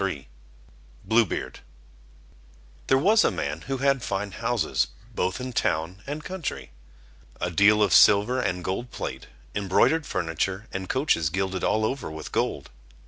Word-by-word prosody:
(page 95 - +2 1.0
40)] - - -22
Blue 115 +3 +4
Beard 65 - -5 1.3
There 135 - +4
was 215 +10 +4
a - - +4
man - - -3
who 135 0 -1
had 135 0 +2
fine 100 -2 -3
houses, - - 0 0.3
both 95 +1 -1
in 125 0 -5
town 85 +1 -1
and 150 +2 -5
country, 165 - -5 0.7
a 90 +1 -2
deal 105 +4 +5
of 100 - +2
silver 105 +6 +6
and 90 -4 -2
gold 95 +8 -3
plate, - - -6 0.3
embroidered 100 - +2
furniture, 95 +3 -2
and 95 -1 -5
coaches 130 - +1
gilded 95 +2 -2
all 110 +1 +2
over 135 +5 -3
with 80 -1 -8
gold. - - -2
100 Hz, 150 wpm, -25 LUFS, 90-130 Hz, 1.3 s, silver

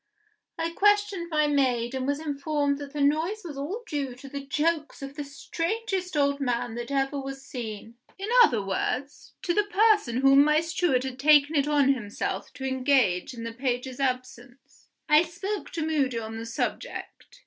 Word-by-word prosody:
I 330 0 -1
questioned 405 -2 +2
my 305 -2 +2
maid, 260 -4 +1
and 260 0 -2
was 285 +1 0
informed 290 -1 -1
that 285 -1 -7
the 295 0 -3
noise 320 +9 +1
was 310 -4 -6
all 340 +13 -4
due 285 - -3
to 255 +2 -12
the 280 0 -6
jokes 300 +1 -1
of 275 0 -6
the 295 - -4
strangest 360 +6 -3
old 280 0 +2
man 245 -3 -1
that 240 +2 -5
ever 275 0 0
was 270 0 -7
seen. 225 -2 -7 0.2
In 390 +1 -5
other 235 - +4
words, 250 +8 -3
to 345 - +1
the 420 +3 +2
person 410 - +3
whom 275 +1 +7
my 300 +1 +4
steward 330 -5 +1
had 260 -1 -6
taken 295 +1 +5
it 285 -1 +2
on 285 -2 +4
himself 215 -5 -4
to 265 - -6
engage 260 -7 +1
in 230 - -7
the 230 0 -5
page's 250 +1 -3
absence. 255 -1 -5 0.2
I 300 0 +6
spoke 385 +4 -4
to 320 -2 -2
Moody 280 -6 0
on 225 -1 -5
the 225 0 -6
subject. 235 - -5
280 Hz, 180 wpm, -27 LUFS, 255-320 Hz, 0.2 s, whom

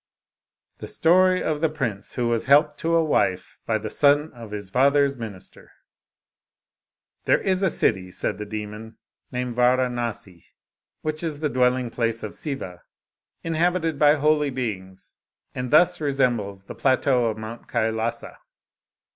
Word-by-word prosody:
STORY 185 +2 +3
OF 150 -1 -1
THE 160 - +2
PRINCE, 115 -10 -4
WHO 120 -2 0
WAS 115 -1 0
HELPED 150 +2 +4
TO 165 0 0
A 165 - +4
WIFE 95 -11 0
BY 110 - +1
THE 110 0 -6
SON 145 +2 +3
OF 115 -2 -10
HIS 100 -2 -6
FATHER'S 140 +2 +3
MINISTER 110 -6 -10 1.5
There - - +3
is 190 -1 0
a 190 - +3
city 95 - +1
(said 95 +2 -3
the 105 - -6
demon) 105 +1 -7 0.3
named 125 -1 -3
Varanasi, 120 -7 0 0.6
which 155 0 -2
is 155 -3 -4
the 150 - 0
dwelling 125 -2 +1
place 115 -1 -1
of 105 - -5
Siva, 115 - -6 0.6
inhabited 165 -1 0
by 150 0 +6
holy 150 0 +2
beings, 100 -8 -6 0.3
and 125 0 -4
thus 175 +4 +4
resembles 120 -9 0
the - - -9
plateau 130 -2 +2
of 110 -1 -2
Mount 110 +2 -8
Kailasa. 110 +1 -2
125 Hz, 140 wpm, -24 LUFS, 110-150 Hz, 1.5 s, by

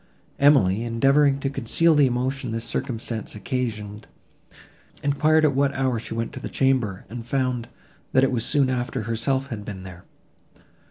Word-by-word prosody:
Emily, 120 -8 +4
endeavouring 135 +4 +3
to 135 - 0
conceal 140 +6 +2
the 145 -3 +5
emotion 130 +2 -2
this 115 0 -3
circumstance 115 -3 -4
occasioned, 105 -3 -4 1.0
enquired 155 +2 +3
at 145 - +3
what 140 +1 +1
hour 130 -3 0
she 115 - -7
went 115 0 -3
to - - -6
the - - -6
chamber, 125 -8 0
and 115 +3 -7
found, 125 -1 -1 0.4
that 130 - +4
it 135 - +3
was 120 -3 0
soon 140 -1 +2
after 125 -3 -2
herself 125 +5 -1
had 110 -4 -5
been 100 -2 -7
there. 90 -2 -11
125 Hz, 160 wpm, -24 LUFS, 115-135 Hz, 1.0 s, the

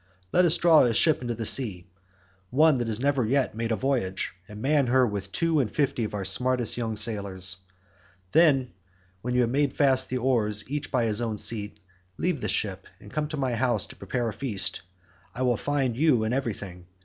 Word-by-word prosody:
Let 180 - +4
us 170 -1 +3
draw 165 -3 +5
a 120 -3 +2
ship 155 +4 +3
into 120 -2 -3
the 115 0 -4
sea—one 95 - 0
that 120 - -2
has 110 -1 -2
never 140 -1 +1
yet 130 +4 +1
made 115 +1 -3
a - - +2
voyage—and 105 -6 -3
man 140 +2 +2
her 130 +1 +4
with 100 -3 -4
two 165 +4 +1
and 125 -6 0
fifty 140 -5 0
of 105 - -5
our 100 -2 -3
smartest 125 +4 +1
young 115 -3 -3
sailors. 100 -4 -3 0.7
Then 135 -7 +3 0.5
when 125 +3 -3
you 125 - +4
have 120 -1 +1
made 140 +1 +1
fast 130 -3 +3
your 130 -2 -2
oars 105 -5 +2
each 145 +2 -4
by 125 -3 +1
his 110 0 +1
own 110 -3 -2
seat, 105 -1 -3 0.4
leave 175 -7 -1
the - - -2
ship 95 -3 -1
and 105 - -14
come 150 -1 -1
to 155 0 -5
my 130 -3 -1
house 120 -3 +1
to - - -11
prepare 120 -2 -3
a 110 - -3
feast.65 95 -6 -6
I - - 0
will 125 -1 +2
find 135 -1 -1
you 135 -4 +3
in 110 +2 -1
everything. 100 -9 -4
120 Hz, 200 wpm, -26 LUFS, 105-135 Hz, 0.7 s, draw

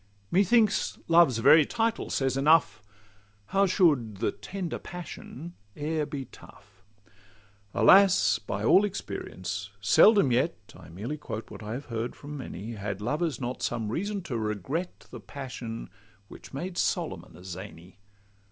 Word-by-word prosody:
Methinks 205 +3 +3
Love's 165 -7 +5
very 155 +7 +7
title 230 +8 -1
says 135 -2 0
enough: 135 - +3 0.7
How 195 0 +4
should 145 - +2
'the - - 0
tender 175 - -5
passion' 175 -2 -9 0.2
e'er 150 0 -1
be 135 -2 -5
tough? 100 -4 -17 0.9
Alas! 180 - +5
by 100 +1 -4
all 190 - +6
experience, 100 - -5
seldom 195 - +5
yet 130 +6 +1 0.2
(I 90 -2 -13
merely 110 - -5
quote 110 -6 -7
what - - -9
I 105 +1 -5
have 135 +4 -6
heard 115 0 -4
from 145 +1 -9
many) 115 -5 -7
Had 100 -3 -5
lovers 150 +5 -1
not 125 0 -4
some 115 -3 -2
reason 200 - -3
to 120 -8 -3
regret 110 - -3
The - - -8
passion 125 -5 -7 0.4
which - - -12
made 175 +6 -4
Solomon - - -2
a 90 - -14
zany. 95 -1 -10
135 Hz, 140 wpm, -28 LUFS, 105-170 Hz, 0.9 s, very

